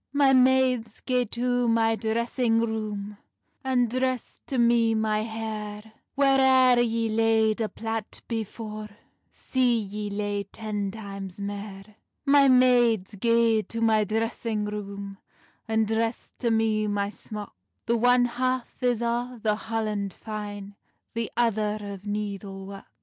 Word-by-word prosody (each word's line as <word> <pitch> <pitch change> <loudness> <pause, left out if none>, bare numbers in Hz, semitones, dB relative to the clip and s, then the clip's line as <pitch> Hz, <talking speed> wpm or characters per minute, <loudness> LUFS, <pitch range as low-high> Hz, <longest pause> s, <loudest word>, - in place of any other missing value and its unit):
"My 280 -1 +4
maides, 255 -3 +3
gae 250 -1 +1
to 245 +2 0
my 225 -1 +3
dressing 225 +2 0
roome, 210 -2 -3 0.4
And 255 -2 +2
dress 255 +1 -2
to 265 - -2
me 235 -1 +4
my 215 -1 +1
hair; 220 -1 -6 0.2
Whaireir 265 -2 +5
yee 230 -1 0
laid 220 0 +2
a 215 - 0
plait 225 -1 -5
before, 215 -1 -5 0.4
See 250 -2 +1
yee 210 0 -5
lay 205 0 -2
ten 210 -1 -4
times 195 -3 -8
mair. 200 +1 -7 0.3
"My 280 -1 +6
maids, 245 -6 +4
gae 230 +1 +3
to 230 +2 -7
my 220 -2 +3
dressing 220 0 -1
room, 200 -1 -6 0.5
And 220 0 +2
dress 225 +2 -2
to 240 - +1
me 220 -1 +2
my 205 0 -1
smock; 210 -1 -8 0.3
The 235 - +2
one 245 +1 +4
half 255 +1 -2
is 245 -2 +1
o 240 +1 -2
the 215 -1 +3
holland 215 -3 -3
fine, 205 -2 -7 0.4
The 230 -1 -3
other 215 -3 +1
o 200 -1 -7
needle 200 -2 -4
work." 195 0 -9
225 Hz, 135 wpm, -26 LUFS, 210-240 Hz, 0.5 s, My